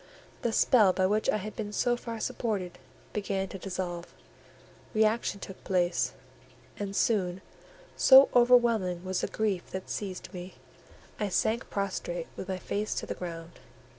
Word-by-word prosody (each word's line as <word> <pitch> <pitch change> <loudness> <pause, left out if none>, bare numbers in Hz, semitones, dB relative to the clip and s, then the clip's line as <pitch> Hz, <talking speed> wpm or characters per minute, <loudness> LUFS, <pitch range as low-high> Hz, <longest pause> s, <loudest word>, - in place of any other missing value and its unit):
The 235 - 0
spell 215 -4 +5
by 185 - +2
which 210 +3 +1
I - - +3
had 210 +1 -6
been 210 -2 -4
so 240 +3 +1
far 230 -2 -6
supported 200 -7 -3 0.3
began 195 -2 -2
to 195 - -7
dissolve; 180 -2 -4 0.8
reaction 215 -1 +2
took 190 -1 -9
place, 180 -2 +1 0.7
and 200 -1 -4
soon, 190 -5 +1 0.5
so 265 +1 +8
overwhelming 235 -8 +4
was 185 -1 -1
the - - -1
grief 205 -5 -2
that 190 0 -6
seized 190 -1 -5
me, 180 0 -8 0.6
I 210 -2 0
sank 220 +5 0
prostrate 185 -4 -3
with 190 - -6
my 190 - -1
face 205 +3 -2
to - - -3
the - - -3
ground. 165 -1 -8
195 Hz, 150 wpm, -29 LUFS, 185-220 Hz, 0.8 s, so